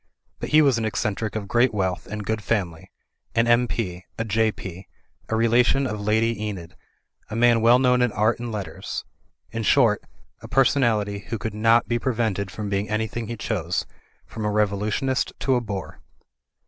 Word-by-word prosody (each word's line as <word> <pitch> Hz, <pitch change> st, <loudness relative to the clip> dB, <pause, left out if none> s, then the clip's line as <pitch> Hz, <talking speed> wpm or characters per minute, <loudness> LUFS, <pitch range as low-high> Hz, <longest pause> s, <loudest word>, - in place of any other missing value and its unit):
But -, -, -4 dB
he 155 Hz, 0 st, +6 dB
was 135 Hz, -5 st, +3 dB
an -, -, -2 dB
eccen 105 Hz, -1 st, -1 dB
tric 110 Hz, -2 st, -4 dB
of 105 Hz, -2 st, -3 dB
great 120 Hz, +2 st, +2 dB
wealth 95 Hz, -3 st, -1 dB
and 105 Hz, -1 st, -5 dB
good 110 Hz, 0 st, -1 dB
family, 90 Hz, -8 st, -2 dB, 0.5 s
an 115 Hz, 0 st, +4 dB
M.P., 115 Hz, -6 st, +1 dB
a 115 Hz, -, -2 dB
J.P., 100 Hz, -4 st, -2 dB, 0.4 s
a 110 Hz, -, 0 dB
relation 120 Hz, +4 st, +3 dB
of 105 Hz, -4 st, -3 dB
Lady 110 Hz, +1 st, +1 dB
Enid, 95 Hz, -6 st, -6 dB, 0.5 s
a -, -, -5 dB
man 120 Hz, 0 st, +4 dB
well 120 Hz, +2 st, +6 dB
known 125 Hz, -1 st, +3 dB
in 125 Hz, -2 st, +2 dB
art 110 Hz, +3 st, +1 dB
and 120 Hz, -1 st, -4 dB
letters; 100 Hz, -7 st, -5 dB, 0.5 s
in 115 Hz, -, -3 dB
short, 115 Hz, -2 st, +4 dB, 0.4 s
a -, -, -9 dB
personality 115 Hz, -7 st, +2 dB
who 115 Hz, -, -2 dB
could 110 Hz, +1 st, -4 dB
not 115 Hz, +2 st, +3 dB
be 120 Hz, 0 st, 0 dB
pre 130 Hz, -1 st, -1 dB
vented 100 Hz, -4 st, -1 dB
from 105 Hz, +2 st, -5 dB
being 100 Hz, +1 st, -1 dB
an)rthing 110 Hz, +1 st, -2 dB
he 115 Hz, -, -5 dB
chose, -, -, -2 dB, 0.4 s
from 110 Hz, -, -7 dB
a 105 Hz, -, +1 dB
revolu 105 Hz, -1 st, +1 dB
tionist 130 Hz, +3 st, -1 dB
to 135 Hz, -, +1 dB
a 125 Hz, -, +2 dB
bore. 100 Hz, -5 st, -6 dB
110 Hz, 185 wpm, -24 LUFS, 105-120 Hz, 0.5 s, he